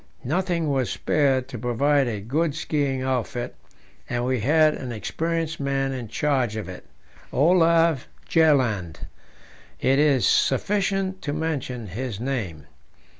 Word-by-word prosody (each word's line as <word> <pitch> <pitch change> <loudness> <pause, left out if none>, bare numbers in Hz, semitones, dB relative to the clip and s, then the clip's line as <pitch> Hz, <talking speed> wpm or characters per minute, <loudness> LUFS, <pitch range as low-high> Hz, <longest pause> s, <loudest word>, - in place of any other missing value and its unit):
Nothing 170 +2 0
was 130 -3 0
spared 135 -4 +1
to 125 -4 -6
provide 135 +4 +2
a 105 -4 -3
good 150 +8 -1
skiing 140 -4 -1
outfit, 125 -2 -2 0.6
and 120 0 -1
we 130 -1 0
had 155 +6 +4
an 130 -3 -6
experienced 165 +7 -2
man 135 -1 0
in 125 -3 -5
charge 130 -2 0
of 110 -5 -4
it 90 -1 -9 0.5
Olav 165 -1 +3 0.2
Bjaaland. 125 - +2 0.8
It 135 +2 +2
is 145 -4 +3
sufficient 195 +5 +1
to 145 - -3
mention 145 -7 -3
his 105 +2 -5
name. 115 - -3
135 Hz, 125 wpm, -24 LUFS, 120-160 Hz, 0.8 s, had